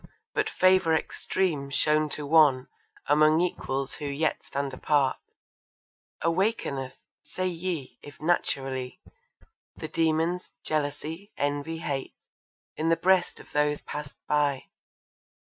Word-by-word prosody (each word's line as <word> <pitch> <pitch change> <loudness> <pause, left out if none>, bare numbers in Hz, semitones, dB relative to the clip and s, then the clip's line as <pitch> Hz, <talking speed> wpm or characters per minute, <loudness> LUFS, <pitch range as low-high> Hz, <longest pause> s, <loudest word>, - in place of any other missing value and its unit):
but - - +1
favour 185 -3 +4
extreme 160 -4 -1
shown 150 +2 +2
to 150 0 -4
one 145 -4 +5 0.4
Among 155 +2 +5
equals 140 -6 -1
who 150 - -6
yet 150 +3 -1
stand 140 -1 -3
apart, 140 0 +2 1.1
Awakeneth, 165 - 0 0.3
say 185 - -4
ye, 170 -5 -3
if 145 - -12
naturally, 135 -5 -1 0.8
The 155 - -6
demons 165 +3 0
jealousy, 155 +6 -3
envy, 145 +3 -1
hate, 145 -5 -4 0.6
In 160 +1 0
the 165 - +4
breast 185 -1 +2
of - - -15
those 150 0 +1
passed 150 -1 -7
by. 145 -3 +2
150 Hz, 110 wpm, -27 LUFS, 140-165 Hz, 1.1 s, one